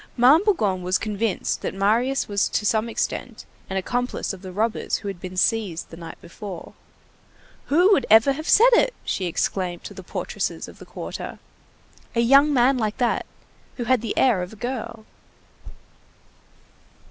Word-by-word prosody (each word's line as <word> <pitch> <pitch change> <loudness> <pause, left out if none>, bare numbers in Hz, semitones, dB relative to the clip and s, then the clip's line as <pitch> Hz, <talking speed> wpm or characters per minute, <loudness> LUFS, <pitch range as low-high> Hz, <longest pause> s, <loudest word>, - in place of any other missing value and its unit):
Ma'am 270 +9 +6
Bougon 210 - +1
was 180 +1 +1
convinced 215 -2 -2
that - - -4
Marius 230 +7 +1
was 200 -1 0
to 210 - -1
some 220 +2 +1
extent 230 +1 -4 0.2
an 190 - -2
accomplice 245 +4 -2
of 190 - -10
the 190 -1 -8
robbers 220 +4 -1
who 205 - -8
had 195 -3 -5
been 185 0 -7
seized 190 -3 0
the - - -8
night 165 -1 -10
before. 180 +1 -9 0.9
"Who 355 +7 +4
would 280 -11 +3
ever 225 +5 +6
have 310 +4 -4
said 480 +3 +6
it?" - - +3
she 190 - -2
exclaimed 175 +1 -2
to - - -8
the - - -9
portresses - - -4
of - - -14
the - - -12
quarter, - - -7 0.8
"a - - +1
young 275 +5 +5
man 255 0 +3
like 215 -2 -2
that, 240 -2 0 0.5
who 245 - -2
had 255 -1 +2
the 225 - -4
air 240 -8 +3
of 180 - -5
a - - -10
girl!" 230 -1 -5
225 Hz, 170 wpm, -23 LUFS, 195-255 Hz, 0.9 s, Ma'am